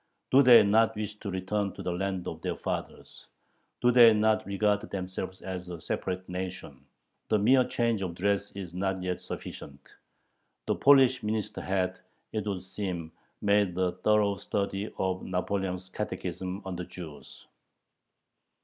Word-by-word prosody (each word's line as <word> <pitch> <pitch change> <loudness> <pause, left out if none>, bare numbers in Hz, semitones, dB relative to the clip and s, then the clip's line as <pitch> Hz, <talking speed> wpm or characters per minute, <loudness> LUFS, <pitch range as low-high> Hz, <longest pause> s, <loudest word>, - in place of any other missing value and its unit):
Do 135 - +7
they 125 -4 +9
not 110 +2 +3
wish 105 0 -3
to 100 - -5
return 95 +2 -2
to - - -8
the 90 - -1
land 95 0 -2
of - - -6
their - - -2
fathers?... - - -6 0.5
Do 125 - +5
they 120 -2 +8
not 110 0 +2
regard 100 +1 +1
themselves 95 0 -5
as 90 -1 -5
a 85 -2 -6
separate 95 +3 -3
nation?... 90 -7 -6 0.4
The 110 - +4
mere 130 +6 +5
change 115 -4 0
of 90 -3 -3
dress 100 +2 0
is 95 -4 -7
not 95 0 -2
yet 90 -1 -2
sufficient." 70 0 -9 0.7
The - - +1
Polish 135 -2 +5
minister 105 0 -2
had, 95 -1 -1 0.3
it 105 -1 -2
would 95 -3 -3
seem, 95 -4 -4 0.3
made 100 -3 +2
a 90 -1 +2
thorough 100 +2 +2
study 100 +2 -2
of 95 -1 -1
Napoleon's 95 0 -2
catechism 95 -1 -4
on 95 -2 -4
the 90 - -4
Jews. 80 -5 -11
95 Hz, 150 wpm, -29 LUFS, 90-105 Hz, 0.7 s, they